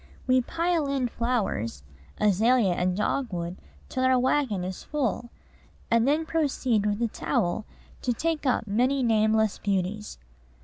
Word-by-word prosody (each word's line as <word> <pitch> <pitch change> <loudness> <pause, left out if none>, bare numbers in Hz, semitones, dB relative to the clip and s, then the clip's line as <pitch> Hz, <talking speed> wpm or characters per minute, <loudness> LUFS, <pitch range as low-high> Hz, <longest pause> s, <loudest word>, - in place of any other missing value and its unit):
We 255 0 +4
pile 335 +2 0
in 270 -3 0
flowers 205 - -2 0.4
azalea 210 0 +3
and 180 +1 0
dogwood 185 -6 -2 0.3
till 260 - -2
our 260 0 +4
wagon 250 -6 +1
is 185 0 -5
full, 245 -5 -2 0.6
and 230 +1 +4
then 305 +3 +2
proceed 260 -9 0
with 205 0 0
a - - +3
trowel 210 -1 -1 0.4
to 250 - 0
take 310 +4 -1
up 250 - +1
many 250 +6 +1
nameless 220 -2 +2
beauties. 200 +1 -2
230 Hz, 135 wpm, -26 LUFS, 205-260 Hz, 0.6 s, We